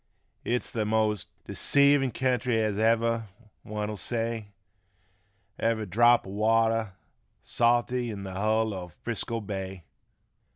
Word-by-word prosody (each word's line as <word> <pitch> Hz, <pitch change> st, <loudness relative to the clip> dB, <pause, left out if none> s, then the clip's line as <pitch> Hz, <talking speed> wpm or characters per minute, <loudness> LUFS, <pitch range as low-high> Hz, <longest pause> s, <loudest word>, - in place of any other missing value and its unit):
It's 125 Hz, +1 st, -1 dB
th' 110 Hz, -, -1 dB
most 105 Hz, -2 st, 0 dB, 0.2 s
deceivin' 140 Hz, -1 st, +3 dB
kentry 125 Hz, -1 st, 0 dB
as 105 Hz, -2 st, 0 dB
ever' 115 Hz, 0 st, +2 dB, 0.4 s
one'll 105 Hz, 0 st, -4 dB
say 115 Hz, -1 st, -3 dB, 1.1 s
Ever' 115 Hz, -1 st, 0 dB
drap 120 Hz, +4 st, +4 dB
o' 95 Hz, -, -8 dB
water 110 Hz, 0 st, +2 dB, 0.5 s
salty 120 Hz, +1 st, +1 dB
in 100 Hz, -3 st, -6 dB
th' -, -, -6 dB
hull 110 Hz, +2 st, +1 dB
o' 90 Hz, -2 st, -6 dB
Frisco 115 Hz, +6 st, -4 dB
bay. 95 Hz, -3 st, -6 dB
110 Hz, 115 wpm, -27 LUFS, 105-120 Hz, 1.1 s, drap